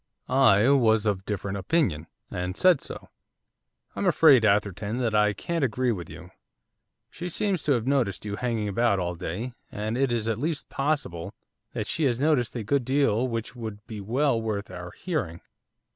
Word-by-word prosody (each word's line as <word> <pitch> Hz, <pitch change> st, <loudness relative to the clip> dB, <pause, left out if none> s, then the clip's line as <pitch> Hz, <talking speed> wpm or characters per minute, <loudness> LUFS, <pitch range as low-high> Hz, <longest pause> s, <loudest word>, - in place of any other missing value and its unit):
I 125 Hz, -5 st, +5 dB
was 110 Hz, -6 st, +4 dB
of 100 Hz, -3 st, +1 dB
a -, -, -23 dB
different 100 Hz, -1 st, -3 dB
opinion, 95 Hz, -, 0 dB, 0.2 s
and 90 Hz, +1 st, -3 dB
said 180 Hz, -6 st, +5 dB
so. -, -, -8 dB, 0.9 s
'I'm -, -, -1 dB
afraid, 140 Hz, -7 st, +6 dB
Atherton, 105 Hz, +1 st, +1 dB
that 120 Hz, -4 st, 0 dB
I 105 Hz, -1 st, +3 dB
can't 165 Hz, -, -2 dB
agree 125 Hz, 0 st, +1 dB
with 90 Hz, -7 st, -5 dB
you. -, -, -11 dB, 0.8 s
She 175 Hz, +1 st, -6 dB
seems 190 Hz, -1 st, 0 dB
to 145 Hz, -, +4 dB
have 120 Hz, -3 st, -1 dB
noticed 125 Hz, -9 st, 0 dB
you 100 Hz, -1 st, -4 dB
hanging 115 Hz, -3 st, -1 dB
about 110 Hz, +1 st, +2 dB
all 90 Hz, -1 st, -2 dB
day; 90 Hz, +8 st, -5 dB, 0.2 s
and 110 Hz, +2 st, -3 dB
it 135 Hz, 0 st, +1 dB
is 115 Hz, -2 st, -1 dB
at 115 Hz, -1 st, -1 dB
least 155 Hz, +2 st, -2 dB
possible 135 Hz, -, -2 dB, 0.4 s
that -, -, -3 dB
she 160 Hz, -, 0 dB
has 120 Hz, -3 st, +1 dB
noticed 140 Hz, -6 st, +1 dB
a 115 Hz, -, -3 dB
good 140 Hz, +5 st, +1 dB
deal 130 Hz, -2 st, +2 dB
which 115 Hz, 0 st, -4 dB
would 110 Hz, -3 st, -7 dB
be 110 Hz, -2 st, -7 dB
well 120 Hz, +3 st, +1 dB
worth 105 Hz, -3 st, -3 dB
our 90 Hz, -1 st, -7 dB
hearing. 125 Hz, -, -4 dB
115 Hz, 180 wpm, -26 LUFS, 100-135 Hz, 0.9 s, afraid